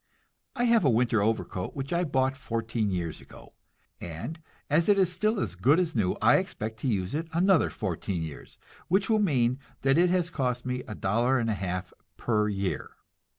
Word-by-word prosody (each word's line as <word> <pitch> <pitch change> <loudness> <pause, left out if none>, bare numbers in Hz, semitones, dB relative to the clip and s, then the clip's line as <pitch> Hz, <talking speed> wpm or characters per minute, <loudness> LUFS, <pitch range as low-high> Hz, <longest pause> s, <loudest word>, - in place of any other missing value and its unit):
I 240 - 0
have 230 -4 +4
a 140 - +4
winter 115 -2 +2
overcoat 105 -3 -2
which 135 +3 -4
I 170 +1 +2
bought 130 -2 +1
fourteen 115 -4 -2
years 85 -4 -3
ago, - - -15 0.5
and 85 - -6 0.3
as 160 +6 +2
it 205 - +5
is 185 -2 +3
still 215 +3 0
as - - -2
good 125 - +3
as 175 -3 0
new 100 -6 +1
I - - +5
expect 110 +1 -4
to 135 - -3
use 95 -6 -1
it 160 +2 -2
another 180 0 +4
fourteen 90 -4 -3
years, 80 -3 -9 0.3
which 195 +5 +2
will 215 - +4
mean 130 - +2 0.2
that 135 +3 +3
it 180 +1 +4
has 180 -1 +1
cost 125 -4 -2
me 125 0 -2
a 105 - -6
dollar 120 +8 +1
and 115 -2 0
a - - +1
half 90 -2 -4 0.2
per 105 -3 +1
year. 100 -2 -3
125 Hz, 195 wpm, -28 LUFS, 105-165 Hz, 0.5 s, it